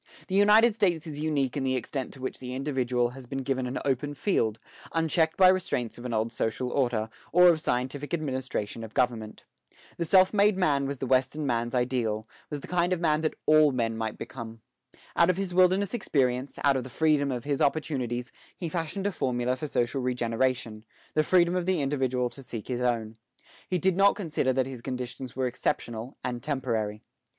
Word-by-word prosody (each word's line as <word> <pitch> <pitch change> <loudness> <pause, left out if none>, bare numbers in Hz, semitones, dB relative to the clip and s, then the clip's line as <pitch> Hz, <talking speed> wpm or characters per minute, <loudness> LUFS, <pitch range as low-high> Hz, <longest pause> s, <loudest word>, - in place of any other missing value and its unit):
The - - -4
United 210 +3 +6
States 175 -7 +1
is 150 -3 -6
unique 145 -4 0
in 140 - -1
the 130 -1 +1
extent 130 +2 -3
to 130 - -13
which 130 - -4
the 125 0 -6
individual 130 -3 0
has 130 0 -11
been 135 +1 -4
given 130 -1 -1
an 125 - -3
open 140 +2 -1
field, 115 - 0 0.4
unchecked 160 0 +1
by 185 - +7
restraints 175 -12 +1
of 120 - -9
an 125 - -3
old 110 0 0
social 125 +3 -2
order, 120 -5 0 0.2
or 180 +1 +7
of 160 -2 +2
scientific 130 +2 -2
administration 130 -8 -3
of 110 - -10
government. 115 -4 -1 0.5
The 170 - -1
self 185 +3 +5
made 205 -1 +4
man 145 -7 +2
was 140 0 -3
the 135 - -3
Western 130 +4 +1
man's 120 -1 -1
ideal, 120 -4 0 0.2
was 145 -1 -5
the - - -9
kind 180 0 +1
of 180 - -1
man 155 -2 +2
that 155 - -1
all 155 -1 +6
men 115 -3 -1
might 110 -1 -3
become. 115 -2 -8 0.5
Out 170 +1 +5
of 185 - +2
his 195 -2 -3
wilderness 185 +2 +3
experience, 130 - 0
out 140 -1 +4
of 130 - -1
the 130 - -9
freedom 150 0 +2
of 125 -2 -3
his 140 -1 -1
opportunities, 130 -5 -1 0.3
he 170 - -4
fashioned 170 +4 -3
a 205 - +1
formula 125 -6 -1
for 150 +4 -5
social 130 0 0
regeneration, 120 -2 -1 0.3
the 155 - +3
freedom 175 +1 +3
of 180 -1 -1
the 185 -3 +2
individual 130 -3 0
to 140 - -11
seek 120 -3 -7
his 125 -1 -2
own. 115 -3 -1 0.5
He 185 - +1
did 185 +1 +2
not 200 +1 +5
consider 160 -9 0
that 130 0 +1
his 130 -3 -7
conditions 125 0 -5
were 130 0 0
exceptional 120 0 -3
and 120 -1 -3
temporary. 115 -7 -2
135 Hz, 195 wpm, -28 LUFS, 125-160 Hz, 0.5 s, by